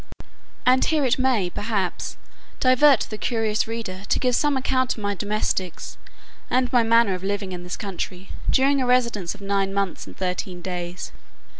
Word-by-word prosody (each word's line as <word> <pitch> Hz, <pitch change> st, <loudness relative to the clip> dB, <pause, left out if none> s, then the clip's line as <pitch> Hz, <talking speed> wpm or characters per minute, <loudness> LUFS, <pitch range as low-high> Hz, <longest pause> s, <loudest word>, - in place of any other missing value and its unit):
And 255 Hz, +1 st, +5 dB
here 305 Hz, -3 st, +2 dB
it 255 Hz, +1 st, +2 dB
may, 240 Hz, -9 st, +2 dB
perhaps, 205 Hz, -3 st, -2 dB, 0.4 s
divert 255 Hz, 0 st, +5 dB
the 215 Hz, -, -5 dB
curious 220 Hz, -2 st, 0 dB
reader, 225 Hz, -5 st, -5 dB
to -, -, +3 dB
give 250 Hz, -2 st, +1 dB
some 290 Hz, -2 st, +2 dB
account 260 Hz, -1 st, +1 dB
of 215 Hz, -, -9 dB
my 205 Hz, 0 st, 0 dB
domestics, 200 Hz, -3 st, -2 dB, 0.5 s
and 255 Hz, 0 st, +1 dB
my 245 Hz, -, +6 dB
manner 230 Hz, -2 st, +4 dB
of 185 Hz, 0 st, -5 dB
living 200 Hz, -1 st, -2 dB
in 180 Hz, -1 st, -5 dB
this 180 Hz, 0 st, -6 dB
country, 190 Hz, -2 st, -5 dB, 0.2 s
during 275 Hz, +1 st, +3 dB
a 255 Hz, -, 0 dB
residence 235 Hz, -8 st, +1 dB
of 205 Hz, -, -16 dB
nine 195 Hz, -1 st, 0 dB
months, 200 Hz, -2 st, -2 dB
and -, -, -12 dB
thirteen 180 Hz, 0 st, -3 dB
days. 175 Hz, 0 st, -5 dB
210 Hz, 170 wpm, -24 LUFS, 190-250 Hz, 0.5 s, my